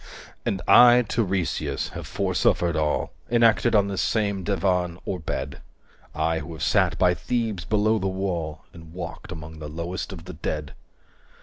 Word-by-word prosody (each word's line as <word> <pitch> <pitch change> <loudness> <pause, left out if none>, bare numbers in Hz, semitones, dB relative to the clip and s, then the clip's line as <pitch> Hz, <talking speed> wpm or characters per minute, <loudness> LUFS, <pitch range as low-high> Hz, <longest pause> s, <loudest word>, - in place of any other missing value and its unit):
(And 95 - -1
I 125 0 +8
Tiresias 90 - -1
have - - -8
foresuffered 85 -1 +1
all 75 -1 0 0.2
Enacted 115 -2 +4
on 100 -1 +4
this 100 -2 -2
same 100 -4 0
divan 90 -2 0
or 95 - -3
bed; 80 - -4 0.5
I 80 +1 0
who 80 +2 -7
have 80 - -6
sat - - +2
by 90 -1 +4
Thebes 110 -4 -2
below 110 +3 +2
the 95 - -1
wall 90 -5 -3
245 85 - -11
And 80 0 -14
walked 90 -2 -7
among 80 0 -8
the 75 -1 -6
lowest 85 +5 -4
of 85 -3 -9
the 90 - -8
dead.) 75 -2 -4
90 Hz, 165 wpm, -25 LUFS, 80-100 Hz, 0.5 s, I